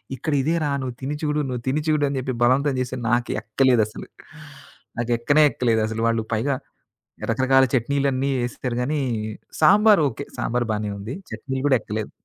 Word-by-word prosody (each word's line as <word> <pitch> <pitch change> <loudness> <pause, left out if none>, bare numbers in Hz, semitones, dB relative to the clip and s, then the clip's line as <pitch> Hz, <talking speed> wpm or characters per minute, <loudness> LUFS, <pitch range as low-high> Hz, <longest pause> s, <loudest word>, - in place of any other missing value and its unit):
"ఇక్కడ 150 +5 -3
ఇదేరా 155 +1 0
నువ్వు 125 -2 -4
తిని 140 +3 -3
చిడు, 150 -1 0
నువ్వు 125 -2 -3
తిని 140 +4 +1
చిడు" 155 -1 +2
అని 140 - -3
చెప్పి 130 0 -3
బలవంతం 135 +3 +3
చేసి 130 0 -3
నాకు 120 0 +1
ఎక్కలేదసలు, 110 -1 +1 0.9
నాకు 120 0 -1
ఎక్కనే 145 +6 +4
ఎక్కలేదసలు, 110 -2 0
వాళ్ళు 115 -1 +1
పైగా 130 +6 0 0.8
రకరకాల 130 +3 +4
చట్నీలన్నీ 135 +2 +1
ఏసిచ్చారు 120 0 -4
గానీ 145 +4 -1 0.6
సాంబార్ 205 +3 +6
ఓకే, 115 - -7
సాంబార్ 120 0 -1
బానే 105 0 -2
ఉంది. 110 +6 -6 0.2
చట్నీలు 130 +4 -4
కూడా 135 - +5
ఎక్కలేదు. 105 0 -5
130 Hz, 150 wpm, -23 LUFS, 115-145 Hz, 0.9 s, సాంబార్